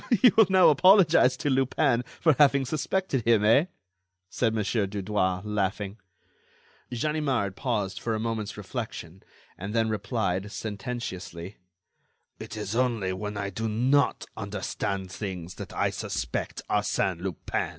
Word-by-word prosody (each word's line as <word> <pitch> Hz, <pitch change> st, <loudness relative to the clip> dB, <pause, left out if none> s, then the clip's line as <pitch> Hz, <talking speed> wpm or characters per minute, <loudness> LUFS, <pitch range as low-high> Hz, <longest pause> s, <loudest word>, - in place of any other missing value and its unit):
"You 240 Hz, +1 st, +6 dB
will 220 Hz, -3 st, +6 dB
now 190 Hz, -1 st, +6 dB
apologize 165 Hz, -5 st, +5 dB
to 145 Hz, -, -1 dB
Lupin 130 Hz, -1 st, +2 dB, 0.2 s
for 160 Hz, -2 st, +4 dB
having 140 Hz, -2 st, +5 dB
suspected 155 Hz, 0 st, -1 dB
him, 115 Hz, -2 st, +3 dB
eh?" 125 Hz, +9 st, +5 dB, 0.7 s
said 115 Hz, -3 st, +1 dB
Mon. 110 Hz, -1 st, -1 dB
Dudouis, 100 Hz, -2 st, -1 dB
laughing. 100 Hz, 0 st, -2 dB, 0.9 s
Ganimard 130 Hz, -6 st, -1 dB
paused 105 Hz, -7 st, -2 dB
for 115 Hz, -1 st, -2 dB
a -, -, -2 dB
moment's 110 Hz, -2 st, -3 dB
reflection, 100 Hz, -4 st, -6 dB, 0.4 s
and 100 Hz, +4 st, -5 dB
then 115 Hz, -1 st, +2 dB
replied, 100 Hz, -2 st, -2 dB
sententiously: 105 Hz, -5 st, -6 dB, 0.8 s
"It 110 Hz, -, -8 dB
is 105 Hz, 0 st, -4 dB
only 115 Hz, -7 st, 0 dB
when 105 Hz, +2 st, -5 dB
I 100 Hz, -1 st, -3 dB
do 110 Hz, +4 st, -3 dB
not 130 Hz, +6 st, +2 dB
understand 100 Hz, -2 st, -4 dB
things 95 Hz, -4 st, -6 dB
that -, -, -7 dB
I -, -, 0 dB
suspect -, -, -4 dB
Arsène 90 Hz, -3 st, 0 dB
Lupin." 95 Hz, -1 st, -3 dB
110 Hz, 130 wpm, -27 LUFS, 100-130 Hz, 0.9 s, You